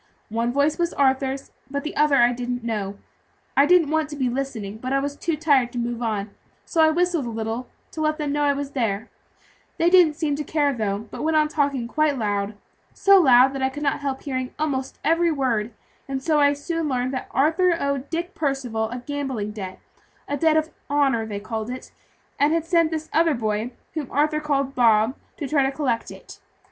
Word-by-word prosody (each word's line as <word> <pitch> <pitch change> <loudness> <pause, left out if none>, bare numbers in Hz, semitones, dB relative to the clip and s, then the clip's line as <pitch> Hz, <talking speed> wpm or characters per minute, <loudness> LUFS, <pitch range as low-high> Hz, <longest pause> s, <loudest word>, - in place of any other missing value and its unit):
One 230 +2 0
voice 285 +5 +1
was 340 -1 0
Arthur's, 270 0 +1 0.2
but 280 0 -3
the 310 - -5
other 300 -1 +4
I 240 -2 +5
didn't 245 0 -4
know. 205 -4 -3 0.6
I 280 +1 +5
didn't 340 -4 +4
want 315 -1 +1
to 295 - -6
be 260 -3 0
listening, 240 -6 -4
but 255 +2 -4
I 275 - +3
was 285 +1 -2
too 325 +1 -2
tired 275 -6 +3
to - - -5
move 240 0 -2
on; 210 -3 -2 0.3
so 330 - +1
I 315 - +6
whistled 340 -4 +1
a - - -3
little, 225 +2 -4 0.2
to 315 - -5
let 305 0 +1
them 295 -2 -2
know 295 +1 0
I 290 -1 +3
was 280 0 -4
there; 225 -6 -2 0.7
they 340 +1 +3
didn't 350 -5 +6
seem 300 -2 -1
to 300 - -2
care, 290 -1 +1
though, 215 -2 -2
but - - -6
went 315 0 +2
on 305 0 +4
talking 280 -5 0
quite 305 +2 +1
loud, 205 -2 -1 0.4
so 395 -1 +6
loud 260 -4 +6
that 270 - -4
I 265 - +2
could 290 +3 -7
not 280 - +1
help 275 -2 -3
hearing 255 -2 -4
almost 275 -4 -2
every 330 +2 +3
word; 240 -7 0 0.4
and 270 -1 -4
so 310 -1 +2
I 285 0 +5
soon 315 +2 -3
learned 255 0 -1
that 260 - -4
Arthur 335 +5 +2
owed 280 -1 -2
Dick 345 +3 -3
Percival 255 -7 -1
a 245 +1 -6
gambling 270 -8 -3
debt 190 -3 -7 0.5
a 285 - -1
debt 315 +1 +3
of 315 +1 0 0.2
honor, 270 -6 +2
they 205 -2 -4
called 220 +1 -4
it 255 +1 -7 0.5
and 290 +2 +4
had 330 -1 0
sent 335 -2 +3
this 315 -1 -4
other 325 -1 +3
boy, 215 0 -1 0.2
whom 300 -5 -4
Arthur 305 +2 +1
called 275 -3 -1
Bob, 225 -1 +4 0.2
to 290 - -4
try 290 0 +2
to 270 - +1
collect 265 -5 -1
it. - - -12
275 Hz, 210 wpm, -23 LUFS, 240-305 Hz, 0.7 s, I